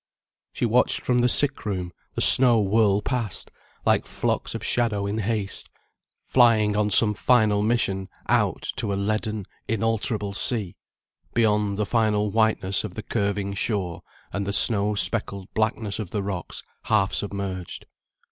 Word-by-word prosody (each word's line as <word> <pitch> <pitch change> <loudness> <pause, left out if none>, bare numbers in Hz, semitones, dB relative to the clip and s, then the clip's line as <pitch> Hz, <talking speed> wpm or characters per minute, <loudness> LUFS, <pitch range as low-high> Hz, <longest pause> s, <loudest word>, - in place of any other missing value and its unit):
She - - -2
watched 120 +2 +2
from 125 -1 +1
the 125 - +3
sick 140 +3 +2
room 90 -4 -4 0.2
the - - -2
snow 125 -3 +8
whirl 105 0 +2
past, 120 -7 -4 0.3
like - - +2
flocks - - -3
of - - -6
shadows 110 -5 0
in 105 +2 -3
haste, 105 -2 -3 0.6
flying 110 -4 +3
on 105 0 +1
some 105 +1 +7
final 110 -3 +2
mission 105 -4 -1 0.2
out - - 0
to 110 -4 -2
a - - -1
leaden 105 +1 -2 0.2
inalterable 110 -2 -2
sea, 105 -3 -3 0.6
beyond 105 -3 +1
the 105 - -1
final 105 -2 0
whiteness 110 -4 +1
of - - -7
the - - -6
curving 100 -1 -2
shore, 100 -4 -3 0.3
and 100 0 -3
the 100 - -2
snow 105 -1 +2
speckled 100 -2 -2
blackness 110 -1 -2
of 105 -5 -5
the 100 +2 -3
rocks 95 -4 -6 0.2
half 95 -3 +1
submerged. 100 -3 -5
105 Hz, 145 wpm, -24 LUFS, 100-115 Hz, 0.6 s, snow